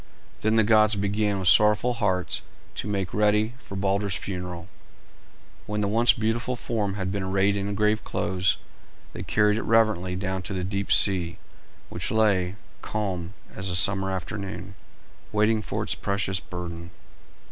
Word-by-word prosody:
Then 110 Hz, +1 st, +2 dB
the 110 Hz, -, +5 dB
gods 110 Hz, 0 st, +4 dB
began 100 Hz, 0 st, 0 dB
with 95 Hz, -2 st, -2 dB
sorrowful 105 Hz, +6 st, +5 dB
hearts 95 Hz, -6 st, -1 dB, 0.3 s
to -, -, -5 dB
make 100 Hz, -3 st, -2 dB
ready 105 Hz, +2 st, +2 dB
for 100 Hz, -, -9 dB
Balder's 100 Hz, 0 st, 0 dB
funeral. 90 Hz, -3 st, -5 dB, 1.0 s
When 105 Hz, 0 st, -2 dB
the 100 Hz, -, +1 dB
once 115 Hz, +3 st, +5 dB
beautiful 115 Hz, +2 st, -1 dB
form 105 Hz, -5 st, -2 dB
had 95 Hz, -2 st, -3 dB
been 100 Hz, 0 st, -2 dB
arrayed 95 Hz, +1 st, +1 dB
in 100 Hz, 0 st, -2 dB
grave 105 Hz, +1 st, +1 dB
clothes 95 Hz, 0 st, 0 dB, 0.6 s
they -, -, -6 dB
carried 105 Hz, 0 st, +2 dB
it -, -, -3 dB
reverently 110 Hz, -5 st, +2 dB
down 95 Hz, 0 st, -2 dB
to 100 Hz, -, -5 dB
the 90 Hz, -, -2 dB
deep 100 Hz, +1 st, -3 dB
sea, 90 Hz, -3 st, +3 dB, 0.5 s
which -, -, -4 dB
lay, 100 Hz, -4 st, +2 dB, 0.3 s
calm 95 Hz, -4 st, -3 dB, 0.2 s
as 95 Hz, +1 st, -2 dB
a 90 Hz, -, -1 dB
summer 95 Hz, +2 st, +3 dB
afternoon, 95 Hz, 0 st, -5 dB, 0.6 s
waiting 110 Hz, +1 st, +2 dB
for -, -, -3 dB
its -, -, 0 dB
precious 100 Hz, -1 st, -1 dB
burden. 85 Hz, -1 st, -7 dB
100 Hz, 155 wpm, -25 LUFS, 95-105 Hz, 1.0 s, the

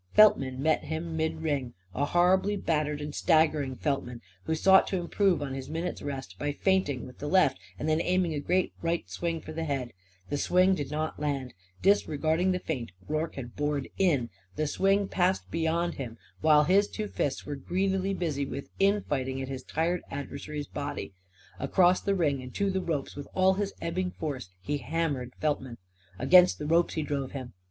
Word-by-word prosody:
Feltman 135 Hz, -11 st, +5 dB
met 160 Hz, 0 st, +2 dB
him 160 Hz, +1 st, -3 dB
in 160 Hz, 0 st, -1 dB
midring; 140 Hz, -6 st, -1 dB, 0.2 s
a 145 Hz, -, 0 dB
horribly 185 Hz, +5 st, +3 dB
battered 150 Hz, -5 st, -1 dB
and 150 Hz, 0 st, -5 dB
staggering 155 Hz, -6 st, +2 dB
Feltman, 125 Hz, -4 st, -2 dB, 0.3 s
who 160 Hz, -, 0 dB
sought 190 Hz, +4 st, +6 dB
to 190 Hz, -, -1 dB
improve 180 Hz, -1 st, +1 dB
on 135 Hz, -2 st, -4 dB
his 135 Hz, -1 st, -6 dB
minute's 165 Hz, +3 st, -3 dB
rest 140 Hz, -2 st, -6 dB
by 145 Hz, 0 st, -1 dB
feinting 145 Hz, -, +1 dB
with 125 Hz, -, -12 dB
the 145 Hz, -, -4 dB
left 185 Hz, +4 st, +3 dB, 0.2 s
and -, -, -3 dB
then 155 Hz, +1 st, +2 dB
aiming 180 Hz, -2 st, +1 dB
a 150 Hz, -, -1 dB
great 180 Hz, +5 st, +1 dB
right 170 Hz, 0 st, -1 dB
swing 165 Hz, -1 st, -2 dB
for 155 Hz, -, -9 dB
the 165 Hz, +1 st, -3 dB
head. 135 Hz, -6 st, -2 dB, 0.4 s
The 145 Hz, -, -1 dB
swing 185 Hz, +4 st, +4 dB
did 145 Hz, -7 st, -3 dB
not 155 Hz, +1 st, -3 dB
land. 140 Hz, -4 st, -2 dB, 0.3 s
Disregarding 165 Hz, -2 st, +2 dB
the 180 Hz, -, +1 dB
feint, 135 Hz, -, -4 dB, 0.2 s
Rorke 155 Hz, +2 st, -2 dB
had 120 Hz, -3 st, -7 dB
bored 145 Hz, -2 st, -1 dB
in. 145 Hz, -11 st, +2 dB, 0.2 s
The 155 Hz, -, 0 dB
swing 195 Hz, +5 st, +2 dB
passed 185 Hz, 0 st, 0 dB
beyond 165 Hz, +1 st, 0 dB
him, 120 Hz, -4 st, -6 dB, 0.2 s
while 150 Hz, -1 st, +5 dB
his 195 Hz, +6 st, +4 dB
two 215 Hz, -1 st, -4 dB
fists 140 Hz, -8 st, -2 dB
were 145 Hz, -, -4 dB
greedily 190 Hz, +6 st, 0 dB
busy 155 Hz, -6 st, -1 dB
with 140 Hz, -, -6 dB
infighting 145 Hz, -10 st, +1 dB
at 135 Hz, 0 st, -4 dB
his 135 Hz, -1 st, -4 dB
tired 165 Hz, +6 st, -1 dB
adversary's 145 Hz, +1 st, -5 dB
body. 145 Hz, -8 st, -5 dB, 0.5 s
Across 180 Hz, -, +4 dB
the 200 Hz, -1 st, +1 dB
ring 145 Hz, -7 st, +1 dB
and 125 Hz, 0 st, -10 dB
to 200 Hz, -1 st, +1 dB
the 190 Hz, 0 st, 0 dB
ropes, 155 Hz, -6 st, -3 dB
with 145 Hz, 0 st, -7 dB
all 190 Hz, 0 st, +5 dB
his 200 Hz, +1 st, -2 dB
ebbing 180 Hz, +2 st, -1 dB
force, 145 Hz, -, -5 dB
he 145 Hz, 0 st, -1 dB
hammered 140 Hz, -2 st, -2 dB
Feltman. 135 Hz, -5 st, -1 dB, 0.4 s
Against 180 Hz, -, +6 dB
the 150 Hz, -, -5 dB
ropes 165 Hz, +3 st, +2 dB
he 155 Hz, -, 0 dB
drove 140 Hz, -2 st, -3 dB
him. 130 Hz, -3 st, -6 dB
155 Hz, 185 wpm, -29 LUFS, 140-180 Hz, 0.5 s, sought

